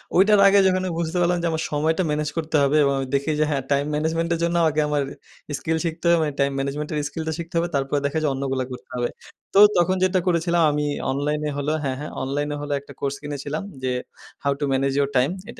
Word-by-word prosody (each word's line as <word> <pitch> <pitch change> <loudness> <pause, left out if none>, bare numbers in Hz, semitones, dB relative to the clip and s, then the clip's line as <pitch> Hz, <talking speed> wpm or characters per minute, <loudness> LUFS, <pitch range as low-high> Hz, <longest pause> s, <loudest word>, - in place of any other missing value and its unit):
ওইটার 200 +2 +5
আগে 200 +1 +6
যখন 185 0 +2
আমি 185 - -2
বুঝতে 170 +1 -2
পারলাম 175 +1 +2
যে - - +2
আমার 160 0 -2
সময়টা 160 +5 +1
ম্যানেজ 150 0 -1
করতে 160 -1 -2
হবে 145 +2 +3
এবং 140 -1 +2
আমি 135 - -3
দেখি 140 +3 0
যে, - - +4
হ্যাঁ 140 -2 0
time 140 +1 +2
management 160 +2 0
এর 165 - -2
জন্য 170 0 +1
আমাকে 155 -1 +2
আমার 150 -1 +1 0.5
স্কিল 160 +4 -1
শিখতে 165 +1 -4
হবে। 170 - +5
মানে 150 -2 -2
time 140 0 +2
management 140 +2 -3
এর 155 - -1
স্কিলটা 160 -1 -4
শিখতে 170 +1 -7
হবে। 170 +1 +1
তারপরে 140 +1 0
দেখা 140 +2 -1
যায় 150 - +2
অন্যগুলো 135 -1 -2
করতে 125 - -9
হবে। 120 -1 -1 0.4
তো 195 - +5 0.2
তখন 185 +2 +3
যেটা 185 0 +3
করেছিলাম 170 0 +2
আমি 150 0 -1 0.3
অনলাইনে 150 +2 -1
হলো 145 +1 -1
হ্যাঁ, 130 -1 -2
হ্যাঁ, 150 - -6
অনলাইন 145 +2 -2
হলো 145 0 -3
একটা 140 0 -14
কোর্স 140 0 -2
কিনেছিলাম 145 +4 -4 0.2
যে 130 - 0 0.5
"How 140 - +2
to 145 - -3
manage 135 0 +1
your 140 - +1
time?" 130 +5 +3 0.2
এটা 230 - -10
150 Hz, 230 wpm, -23 LUFS, 140-165 Hz, 0.5 s, আগে